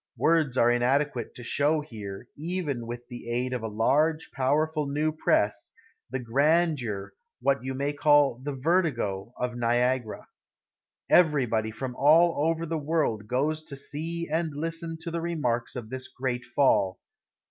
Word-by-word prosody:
Words 155 -6 +2
are 120 0 +5
inadequate 125 +1 0
to 125 - -9
show 150 +5 +1
here, 110 -5 -8
even 150 -7 -3
with 120 0 -7
the 120 -1 -8
aid 125 +2 -1
of 125 - -2
a 110 - -3
large, 150 +9 +1
powerful 150 +3 +1
new 150 +3 0
press, 155 - +1 0.4
the - - -2
grandeur, 135 - +1 0.3
what 140 -2 +1
you 130 0 -3
may 140 +2 -1
call 145 -4 +4
the 145 -1 -3
vertigo, 130 - 0
of 125 -1 -2
Niagara. 120 0 0 0.8
Everybody 130 -10 +3
from 125 +3 -5
all 155 +2 +4
over 165 0 -1
the 165 0 -2
world 145 -9 -1
goes 150 +6 0
to 140 -3 -9
see 165 +5 -4
and 160 -1 -1
listen 165 +2 -3
to 170 0 -4
the 170 0 -2
remarks 125 -9 -1
of 115 -3 -7
this 130 0 -4
great 125 -1 -3
fall. 120 -7 +2
140 Hz, 150 wpm, -27 LUFS, 120-155 Hz, 0.8 s, are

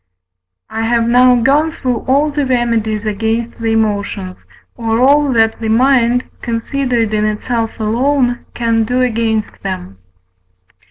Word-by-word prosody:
I 225 - -3
have 230 0 +1
now 250 +1 +5
gone 280 +7 +2
through 255 -6 -2
all 285 +3 +2
the 290 0 -1
remedies 230 -4 0
against 225 +3 -2
the 225 -1 -1
emotions, 200 -4 -2 0.3
or 225 -1 -1
all 285 +2 +4
that 225 -1 +2
the 220 - -2
mind, 245 +1 +3 0.2
considered 235 -1 -1
in 210 0 +1
itself 225 +2 -2
alone, 245 +3 0
can 230 -1 +1
do 250 +3 0
against 225 -2 -1
them. 95 - -6
230 Hz, 130 wpm, -15 LUFS, 220-250 Hz, 0.3 s, now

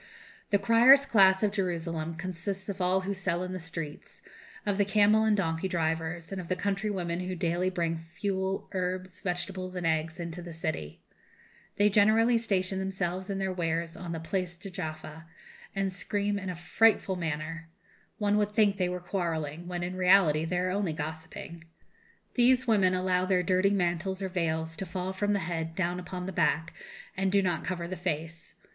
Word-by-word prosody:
"The 205 - +4
criers' 235 +7 +7
class 190 -4 +5
of 210 - +3
Jerusalem 165 -4 -2
consists 185 +3 -4
of 195 -1 -4
all 185 +1 +2
who 195 +2 -2
sell 180 -2 -1
in 185 0 -4
the 185 - -4
streets, 165 -3 -7 0.4
of 205 -1 0
the - - +6
camel 210 +2 +4
and 215 -1 +3
donkey 165 -1 0
drivers, 165 -1 -2
and 195 -1 -3
of 175 - -10
the 185 - 0
country 200 +3 -1
women 175 -4 -2
who 185 0 -3
daily 175 +1 0
bring 165 -2 -2
fuel, 190 -1 -2
herbs, 185 0 -3
vegetables, 185 0 -3
and 180 -2 -3
eggs, 160 +1 0
into 170 +1 -5
the 170 -2 -8
city. 80 - -4 0.7
They 205 - +4
generally 220 +3 +4
station 190 -4 0
themselves 190 -1 -2
and 195 -1 -2
their 190 -1 -1
wares 165 -1 -1
on 175 -2 -6
the 165 - -3
Place 175 +2 -2
de 190 +2 -9
Jaffa, 160 -2 -6 0.5
and 195 -1 0
scream 205 +1 -1
in 190 -1 -5
a 180 - -3
frightful 195 +2 +3
manner; 165 0 -4 0.5
one 210 -1 +2
would 210 0 0
think 210 -2 +3
they 180 -2 +1
were 180 0 -3
quarrelling, 170 -3 -3
when, 175 -1 -3
in 180 +1 -3
reality, 180 -4 +4
they 175 +2 -1
are 185 +1 0
only 195 -4 0
gossiping. 160 +2 -7 0.7
These 255 +1 +4
women 195 -5 +3
allow 185 0 +1
their 185 -1 +2
dirty 185 +2 +3
mantles 190 0 0
or 190 - -2
veils 160 -3 -1
to 195 - -4
fall 185 +2 -3
from 205 +2 0
the 200 - +1
head 165 -1 -3
down 180 0 -1
upon 180 0 -6
the 190 - -4
back, 165 -2 +1 0.4
and 190 0 0
do 200 0 +4
not 180 -2 0
cover 175 -2 -3
the 185 - -4
face. 165 -2 -4
185 Hz, 185 wpm, -29 LUFS, 165-195 Hz, 0.7 s, criers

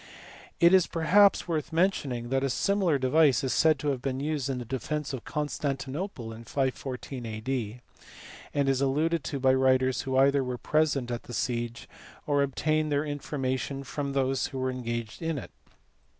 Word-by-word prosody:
It 170 +2 +6
is 185 -2 +5
perhaps 180 +6 +4
worth 160 -2 -2
mention 170 -4 +1
ing 120 -1 -4
that 135 +1 +1
a 135 - +1
similar 190 +2 +2
device 135 0 +3
is 130 - 0
said 160 -2 +4
to 145 +2 -2
have 135 -3 -1
been 130 0 -2
used 145 -2 -2
in 135 - -1
the 125 - -5
defence 135 +4 -3
of 130 - -5
Constantinople 145 - -3
in 115 +1 -10
514 130 0 -3
A.D., 115 +1 -4 0.7
and 140 -1 0
is 135 -1 +2
alluded 150 +4 +1
to 140 - -3
by 130 0 +4
writers 130 -1 +3
who 130 -1 -1
either 140 +1 +4
were 125 -1 -3
present 145 -4 +1
at 120 - -3
the 120 - -7
siege 120 0 -2 0.4
or 145 -1 +2
obtained 155 +3 0
their 145 +1 +1
information 135 -3 -3
from 140 0 -4
those 135 -1 +1
who 135 - -7
were 130 0 -1
engaged 120 -2 -4
in 165 -2 -1
it. 130 - -7
135 Hz, 180 wpm, -28 LUFS, 130-150 Hz, 0.7 s, It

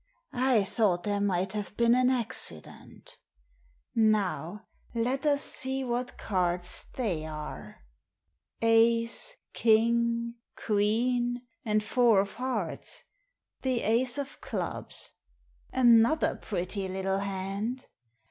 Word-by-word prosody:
I 250 -4 +3
thought 195 -5 +1
there 205 -1 -1
might 190 -1 0
have 210 -1 -5
been 235 0 +4
an 255 0 +4
accident 225 - -1 0.7
Now 210 -3 +1 0.3
let 255 +6 0
us 285 -1 +3
see 265 +1 -1
what 245 0 -3
cards 180 -2 0
they 195 -11 -1
are. 150 - -8 0.8
Ace, 230 - +3 0.2
king, 235 +1 +2 0.2
queen, 240 +4 0 0.2
and 215 -2 +1
four 230 -1 +4
of 200 - -5
hearts, 235 -9 -3 0.6
the 255 -3 0
ace 240 +4 +1
of 280 0 -6
clubs - - -5 0.3
— - - -40 0.2
another 240 +4 +4
pretty 190 0 -4
little 190 +1 -1
hand! 200 +6 -3
225 Hz, 105 wpm, -29 LUFS, 195-245 Hz, 0.8 s, been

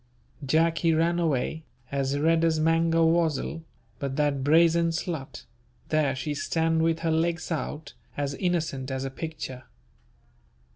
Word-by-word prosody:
Jack 160 +4 +2
he 165 -2 +2
ran 170 +2 +2
away, 160 0 -1 0.3
as 140 0 0
red 165 +2 +2
as 160 -1 +2
mangawazzle, 165 -1 +2 0.4
but 135 -1 -3
that 145 -2 0
brazen 165 +3 +4
slut, 160 -6 -4 0.4
there 150 -3 +1
she 135 +3 -3
stand 160 +2 0
with 165 0 +1
her 165 -1 0
legs 165 +1 0
out, 150 -2 -4 0.2
as 140 -1 -1
innocent 155 -6 -2
as 130 0 -3
a 135 - -4
picture. 135 -4 -6
160 Hz, 135 wpm, -26 LUFS, 140-165 Hz, 0.4 s, brazen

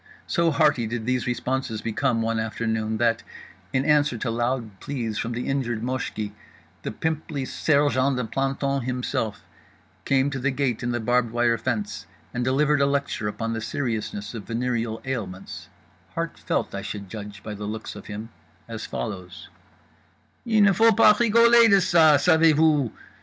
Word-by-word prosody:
So 170 -1 +2
hearty 145 -7 +2
did 115 0 -4
these 125 0 0
responses 125 -2 -2
become 115 +1 0
one 115 0 0
afternoon 110 0 -2
that, 115 0 +2 0.5
in 130 +1 0
answer 150 -4 +3
to 115 +1 -2
loud 120 -3 -2
pleas 115 -7 -3
from 115 - -2
the 120 +1 -4
injured 120 -5 -1
Moshki, 125 -5 -3 0.5
the - - -4
pimply 155 +1 -3
sergeant 140 -3 +2
de 125 - -1
plantons 135 +2 -1
himself 125 -4 -2 0.6
came 135 +3 +2
to 135 - -3
the 135 +3 +1
gate 130 -3 -1
in 120 - -2
the 120 0 -1
barbed 120 +1 +1
wire 120 0 +2
fence 210 - -3 0.3
and 125 - -1
delivered 145 +3 +2
a 140 - +4
lecture 140 -6 -1
upon 115 +2 -3
the 115 - -3
seriousness 110 -4 -3
of 110 -4 -7
venereal 115 -1 -2
ailments 100 -8 -5 0.5
(heart - - -3
felt, - - -2
I 100 - -3
should 100 -1 -6
judge 105 0 -8
by 105 - -5
the 105 0 -6
looks 110 +1 -5
of 105 - -10
him), 105 +2 -6 0.4
as 115 -1 -6
follows: 90 -5 -6 1.0
"_Il 220 -2 +4
ne 200 -1 +5
faut 225 +3 +4
pas 210 - +7
rigoler 235 0 +6
de 200 - +7
ça. 165 -6 +5
Savez 160 0 +5
vous? 150 -5 +3
125 Hz, 165 wpm, -24 LUFS, 110-145 Hz, 1.0 s, pas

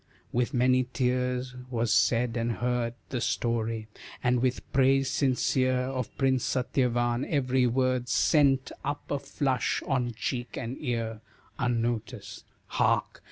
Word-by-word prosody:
With 120 0 0
many 130 +1 +3
tears 125 0 -1
was 120 -2 0
said 120 0 +2
and 115 0 0
heard 120 0 -1
The 125 -3 -2
story, 115 -2 -1 0.4
and 125 0 +2
with 130 0 -2
praise 135 0 +3
sincere 130 -1 +2
Of 130 -2 -4
Prince 130 -2 +2
Satyavan; 120 -1 0
every 130 -3 +2
word 130 0 +1
Sent 135 +1 +3
up 145 +1 -4
a 145 - 0
flush 130 -5 -1
on 125 -4 -1
cheek 120 0 -3
and 115 +3 -4
ear, 115 -5 -3 0.4
Unnoticed. 115 -2 -2 0.2
Hark! - - 0
125 Hz, 125 wpm, -28 LUFS, 120-130 Hz, 0.4 s, many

